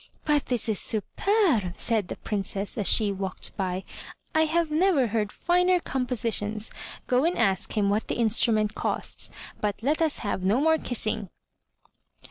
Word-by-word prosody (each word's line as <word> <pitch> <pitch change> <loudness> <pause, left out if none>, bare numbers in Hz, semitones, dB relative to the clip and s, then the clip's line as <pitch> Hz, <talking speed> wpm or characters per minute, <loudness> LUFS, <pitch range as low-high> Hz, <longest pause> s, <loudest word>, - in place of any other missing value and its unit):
"But 295 -2 +2
this 245 -3 -1
is 215 -3 0
superber 240 - +1
said 220 -5 +2
the - - -5
Princess, 200 -1 -3
as 205 - 0
she 210 -3 +4
walked 190 -1 -3
by. 185 -1 -2 0.5
"I 315 0 +4
have 325 0 0
never 320 -4 +3
heard 215 -2 -1
finer 360 +1 +2
compositions. 230 -6 -1 0.3
Go 250 +1 +2
and 345 +3 +1
ask 195 -2 0
him 205 -1 +3
what 210 +2 0
the - - -2
instrument 220 -2 +2
costs, - - -3 0.3
but 210 +1 -2
let 300 +5 +1
us 315 -2 +1
have 195 -2 -2
no 205 +7 +3
more 320 +2 +3
kissing." 215 -4 -2
225 Hz, 155 wpm, -26 LUFS, 205-300 Hz, 0.5 s, she